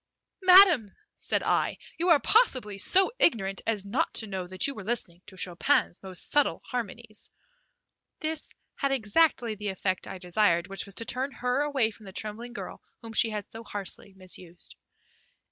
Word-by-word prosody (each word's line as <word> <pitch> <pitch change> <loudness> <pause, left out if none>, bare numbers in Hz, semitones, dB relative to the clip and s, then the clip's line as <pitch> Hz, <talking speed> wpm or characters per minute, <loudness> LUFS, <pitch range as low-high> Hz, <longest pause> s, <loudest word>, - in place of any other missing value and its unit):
"Madam," 365 - +7 0.2
said - - -1
I, - - +1 0.2
"you 350 +2 +1
are 325 -4 +6
possibly 255 - +2
so 380 - +3
ignorant 195 - +2
as 210 -3 0
not 255 +12 0
to 220 - +5
know 190 -3 -5
that 185 0 +1
you 280 - 0
were 215 - -9
listening 190 -6 -3
to 190 - -13
Chopin's 175 -1 0
most 190 -2 -7
subtle 290 -1 +2
harmonies." 230 -2 -6 0.9
This 315 -1 -3 0.3
had 275 -2 0
exactly 245 0 +2
the 210 0 -6
effect 190 -1 -2
I 190 - -6
desired, 180 -1 +1
which 195 - -2
was 200 - -4
to 230 - -2
turn 260 +4 -2
her 250 +3 -1
away 275 -6 +1
from 215 -1 -15
the 190 - -10
trembling 225 +4 -5
girl - - -8 0.2
whom 225 -1 -8
she 225 +1 +4
had 210 -2 -6
so 225 +1 -9
harshly 200 -2 -7
misused. 180 -2 -9
215 Hz, 170 wpm, -28 LUFS, 195-265 Hz, 0.9 s, Madam